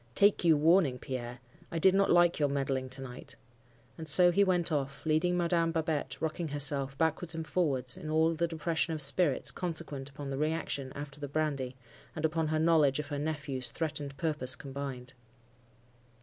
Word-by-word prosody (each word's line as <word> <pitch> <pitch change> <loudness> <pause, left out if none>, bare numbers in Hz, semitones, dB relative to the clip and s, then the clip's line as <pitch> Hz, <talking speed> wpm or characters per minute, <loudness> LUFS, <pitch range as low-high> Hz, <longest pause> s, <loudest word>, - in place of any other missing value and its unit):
Take 205 -1 +4
you 165 -3 +5
warning, 160 -3 +3
Pierre! 125 -1 -6 0.3
I 170 - -3
did 185 +3 +4
not 195 0 +3
like 175 -1 +4
your 145 -1 +2
meddling 135 -2 -2
to 130 +1 -6
night.' 130 +1 -9 0.6
And 160 - -6
so 175 +5 +8
he 200 +3 +4
went 180 -3 +2
off, 140 -1 -3
leaving 165 +3 +2
Madam 170 -1 +1
Babette 155 -4 -2
rocking 160 +1 -2
herself 140 -2 -2
backwards 160 +1 0
and 160 -1 -4
forwards, 140 -6 0
in 165 -4 -7
all 160 +1 +2
the 170 +1 0
depression 165 0 -1
of 155 - 0
spirits 140 +1 +1
consequent 160 -6 -4
upon 140 0 -7
the 135 - -3
reaction 150 -4 -2
after 145 0 -7
the 145 - -5
brandy, 140 -3 -2 0.4
and 155 - -2
upon 160 0 0
her 155 0 0
knowledge 155 -4 +3
of 150 -1 -5
her 145 -1 -3
nephew's 145 -5 -3
threatened 150 -1 -3
purpose 140 -4 -1
combined. 135 -3 -7
150 Hz, 180 wpm, -31 LUFS, 135-165 Hz, 0.6 s, so